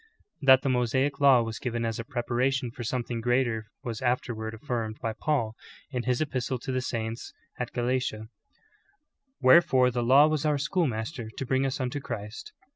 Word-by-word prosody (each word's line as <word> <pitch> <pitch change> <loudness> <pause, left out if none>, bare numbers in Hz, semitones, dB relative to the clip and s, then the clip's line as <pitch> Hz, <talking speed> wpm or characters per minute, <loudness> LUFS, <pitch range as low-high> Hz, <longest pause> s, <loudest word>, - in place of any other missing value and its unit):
That 130 -2 +6
the 140 - +1
^losaic 130 +3 +1
law 135 -4 +6
was 115 0 -5
given 120 -2 -2
as 115 0 -2
a - - -3
preparation 125 +1 -1
for 120 0 -7
something 120 0 -3
greater 120 -2 0 0.2
was 115 -2 -5
afterward 115 -3 -2
afiirmed 115 -4 -3
by 115 - -2
Paul, 115 -5 -1 0.4
in 125 -3 -3
his 125 +1 +1
epistle 130 -3 -1
to 130 +3 -5
the 130 0 0
saints 115 -2 -4 0.3
at 125 -1 -3
Galatia: 120 -3 -1 1.2
''Wherefore 130 -3 +6
the 120 0 -1
law 135 +5 +6
was 155 -1 0
our 150 -2 +2
schoolmaster 135 - -2
to 130 - -6
bring 130 +2 +1
us 130 - -3
unto 130 +2 -2
Christ." 110 -5 -7
125 Hz, 170 wpm, -27 LUFS, 115-135 Hz, 1.2 s, That